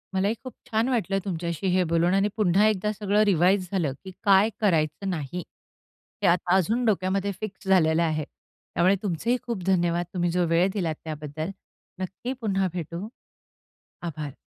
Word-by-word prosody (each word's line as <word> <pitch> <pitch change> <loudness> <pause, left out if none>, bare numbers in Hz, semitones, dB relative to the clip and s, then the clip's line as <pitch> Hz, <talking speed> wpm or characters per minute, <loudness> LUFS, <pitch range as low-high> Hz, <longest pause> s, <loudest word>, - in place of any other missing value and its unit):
मलाही 200 +4 +1
खूप 255 - -7 0.2
छान 225 +3 +1
वाटलं 205 -6 0
तुमच्याशी 170 -1 -2
हे 185 - +4
बोलून. 170 +1 +2
आणि 195 +1 +3
पुन्हा 205 0 +4
एकदा 210 0 +1
सगळं 210 0 +2
रिवाइज 185 0 +3
झालं, 170 -9 0
की 190 - -8
काय 200 0 +5
करायचं 165 -1 +1
नाही? 175 0 -3 0.8
हे - - +5
आता 175 +1 +3
अजून 220 +7 +2
डोक्यामध्ये 195 -1 +1
फिक्स 215 -1 -7
झालेलं 170 -3 +4
आहे. 155 -2 0
त्यामुळे 185 +5 -1
तुमचेही 210 +6 0
खूप 230 -7 -4
धन्यवाद. 175 -2 +2
तुम्ही 175 -2 0
जो 180 0 +2
वेळ 165 +3 +3
दिलात 170 -7 -1
त्याबद्दल. 155 +2 -5 0.5
नक्की 195 +7 -4
पुन्हा 195 -3 +1
भेटू. 175 +3 -5 0.9
आभार. 150 -4 -5
185 Hz, 155 wpm, -26 LUFS, 170-200 Hz, 0.9 s, काय